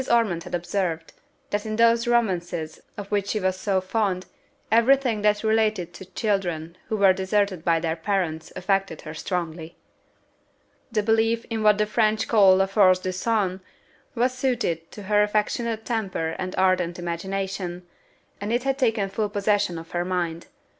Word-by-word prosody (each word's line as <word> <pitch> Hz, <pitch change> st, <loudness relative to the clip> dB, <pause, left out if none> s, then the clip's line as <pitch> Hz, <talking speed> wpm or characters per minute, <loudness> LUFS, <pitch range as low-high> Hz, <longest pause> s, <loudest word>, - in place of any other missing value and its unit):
Ormond 210 Hz, -8 st, +2 dB
had -, -, -3 dB
observed, 170 Hz, -2 st, -2 dB, 0.4 s
that 205 Hz, 0 st, -1 dB
in 215 Hz, -1 st, -3 dB
those 230 Hz, +1 st, +4 dB
romances, 175 Hz, -9 st, 0 dB, 0.2 s
of 205 Hz, 0 st, -7 dB
which 200 Hz, -1 st, 0 dB
she 215 Hz, -, 0 dB
was 185 Hz, -1 st, 0 dB
so 190 Hz, 0 st, 0 dB
fond, 185 Hz, -1 st, -1 dB, 0.5 s
every 235 Hz, +4 st, +6 dB
thing 240 Hz, -6 st, -2 dB
that 210 Hz, 0 st, +2 dB
related 215 Hz, -5 st, +1 dB
to 190 Hz, -, -10 dB
children 180 Hz, -4 st, -2 dB
who 220 Hz, -, -1 dB
were 195 Hz, -2 st, +6 dB
deserted 190 Hz, -2 st, 0 dB
by 165 Hz, -1 st, +3 dB
their 160 Hz, -1 st, -1 dB
parents 165 Hz, -2 st, -2 dB
affected 195 Hz, -3 st, -1 dB
her 155 Hz, -, -8 dB
strongly. 165 Hz, -1 st, -4 dB, 1.2 s
The 215 Hz, -2 st, +1 dB
belief 225 Hz, +1 st, +2 dB
in 225 Hz, -1 st, -1 dB
what 210 Hz, -1 st, +5 dB
the 210 Hz, -, +2 dB
French 215 Hz, 0 st, +1 dB
call 200 Hz, -4 st, +6 dB
la 190 Hz, +1 st, +3 dB
force 195 Hz, -2 st, +4 dB
du 185 Hz, 0 st, -3 dB
sang 190 Hz, -1 st, 0 dB, 0.6 s
was 250 Hz, +2 st, +1 dB
suited 235 Hz, -11 st, -1 dB
to 210 Hz, -, -9 dB
her 210 Hz, +1 st, +3 dB
affectionate 220 Hz, +2 st, 0 dB
temper 190 Hz, -8 st, -2 dB
and 185 Hz, 0 st, -4 dB
ardent 185 Hz, -2 st, +2 dB
imagination, 180 Hz, +1 st, -4 dB, 0.6 s
and 205 Hz, +2 st, -3 dB
it 240 Hz, +1 st, +1 dB
had 270 Hz, 0 st, -1 dB
taken 225 Hz, -6 st, +1 dB
full 210 Hz, +2 st, -2 dB
possession 205 Hz, -3 st, 0 dB
of 165 Hz, 0 st, -10 dB
her 175 Hz, 0 st, -1 dB
mind. 175 Hz, -2 st, -2 dB
195 Hz, 165 wpm, -24 LUFS, 180-220 Hz, 1.2 s, every